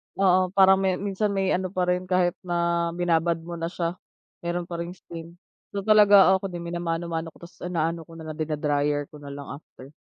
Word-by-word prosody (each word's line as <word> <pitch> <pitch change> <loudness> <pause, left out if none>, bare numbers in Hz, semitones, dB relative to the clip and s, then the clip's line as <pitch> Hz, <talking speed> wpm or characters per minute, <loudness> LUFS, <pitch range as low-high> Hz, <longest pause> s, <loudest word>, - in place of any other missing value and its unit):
Oo, 185 -1 +3
parang 190 0 +6
may 190 -1 +1
minsan 200 +2 -1
may 195 -1 +1
ano 185 +1 0
pa 185 0 -2
rin, 180 0 0
kahit 180 -1 +2
na 170 -1 0
binabad 170 -1 +1
mo 170 0 -7
na 165 - -2
siya, 170 +1 -3 0.4
meron 175 +1 -2
pa 170 -1 -4
ring 170 +1 -5
stain. 170 -1 -10 0.4
So, 200 - -2
talaga 205 -2 +7
oo 190 - +3
ako 195 - -4
din 175 -2 -7
minamano-mano 170 -1 -3
ko - - -19
ta's 170 - -13
inaano 165 -2 -2
ko 165 - -13
na 165 - -9
lang 155 - -10
dina-dryer 150 -1 0
ko 150 - -12
na 140 -1 -9
lang 140 0 -8
after. 135 -3 -16
170 Hz, 210 wpm, -25 LUFS, 165-185 Hz, 0.4 s, talaga